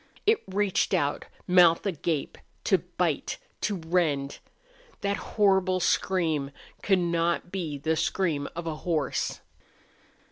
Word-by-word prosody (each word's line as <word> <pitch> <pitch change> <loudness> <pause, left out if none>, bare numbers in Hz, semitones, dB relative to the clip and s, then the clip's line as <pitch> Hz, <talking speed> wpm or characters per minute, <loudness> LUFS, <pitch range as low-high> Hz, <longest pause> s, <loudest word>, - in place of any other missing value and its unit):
It 435 +1 +4
reached 195 0 +1
out, 145 0 0 0.2
mouth 175 -1 +5
agape, 165 -5 -2 0.3
to - - +3
bite, - - -2 0.2
to 205 +1 0
rend. 160 -5 0 0.6
That 200 0 0 0.2
horrible 190 -3 +3
scream 165 -6 +1 0.3
could 195 -2 +3
not 170 0 0
be 165 -7 -3
the 160 +3 0
scream 155 -3 0
of 170 0 -5
a 160 -2 -3
horse. 160 -3 -1
170 Hz, 115 wpm, -27 LUFS, 155-190 Hz, 0.6 s, mouth